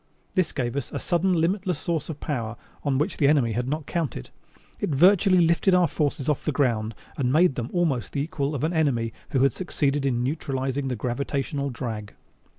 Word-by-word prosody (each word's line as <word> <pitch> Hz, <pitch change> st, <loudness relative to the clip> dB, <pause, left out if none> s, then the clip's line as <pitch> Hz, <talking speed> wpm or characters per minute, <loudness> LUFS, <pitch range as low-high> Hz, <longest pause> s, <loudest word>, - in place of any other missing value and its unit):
This 185 Hz, -4 st, +1 dB
gave 120 Hz, -3 st, -2 dB
us 140 Hz, -3 st, -3 dB
a -, -, -3 dB
sudden 180 Hz, +1 st, +1 dB
limitless 180 Hz, +1 st, +1 dB
source 165 Hz, +1 st, -2 dB
of 155 Hz, -2 st, -5 dB
power 115 Hz, -6 st, -3 dB, 0.3 s
on 140 Hz, -3 st, +1 dB
which 155 Hz, +6 st, -1 dB
the 140 Hz, -, +4 dB
enemy 140 Hz, -6 st, +3 dB
had 120 Hz, +3 st, -1 dB
not 150 Hz, +2 st, -2 dB
counted. 155 Hz, -, -3 dB, 0.5 s
It -, -, -1 dB
virtually 185 Hz, +6 st, +5 dB
lifted 170 Hz, +3 st, +3 dB
our 180 Hz, -1 st, +4 dB
forces 145 Hz, -2 st, -1 dB
off 150 Hz, -3 st, 0 dB
the 155 Hz, -, 0 dB
ground 115 Hz, -6 st, 0 dB, 0.2 s
and 125 Hz, -3 st, +1 dB
made 165 Hz, +2 st, +4 dB
them 120 Hz, -1 st, -4 dB
almost 150 Hz, -, 0 dB
the 140 Hz, -, 0 dB
equal 145 Hz, -1 st, -2 dB
of 140 Hz, -, -3 dB
an 160 Hz, +3 st, +1 dB
enemy 125 Hz, -8 st, +1 dB, 0.2 s
who 135 Hz, -3 st, +2 dB
had 135 Hz, -, +4 dB
succeeded 145 Hz, -6 st, -1 dB
in 120 Hz, -3 st, +1 dB
neutralizing 135 Hz, -1 st, -2 dB
the 130 Hz, -, -1 dB
gravitational 140 Hz, +4 st, -2 dB
drag. 115 Hz, -5 st, -5 dB
140 Hz, 195 wpm, -25 LUFS, 125-165 Hz, 0.5 s, virtually